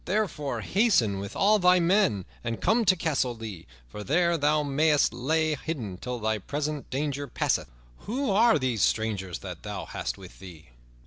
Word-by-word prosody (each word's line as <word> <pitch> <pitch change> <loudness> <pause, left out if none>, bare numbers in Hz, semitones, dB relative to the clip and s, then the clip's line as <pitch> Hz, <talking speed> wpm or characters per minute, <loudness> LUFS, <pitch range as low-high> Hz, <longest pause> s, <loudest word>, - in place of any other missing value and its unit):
Therefore 190 -9 -1
hasten 180 - +2
with 100 0 -7
all 210 +2 +4
thy 180 0 +5
men, 170 - +2 0.2
and 115 -1 -3
come 225 +1 +2
to 185 -1 +5
Castle 140 -8 -1
Lea, 110 - -8 0.2
for 105 +12 -8
there 170 +7 +2
thou 150 0 +2
mayst 145 -1 +2
lie 155 +6 0
hidden 135 - -5
till 125 +4 -5
thy 110 -1 -1
present 145 +6 -4
danger 140 +1 -2
passeth. - - -1 0.4
Who 255 +2 -1
are 225 +2 +5
these 125 -6 -1
strangers 95 -5 0
that - - -7
thou - - -6
hast - - -4
with 95 -2 -13
thee?" 85 -7 -12
145 Hz, 170 wpm, -27 LUFS, 110-175 Hz, 0.4 s, thy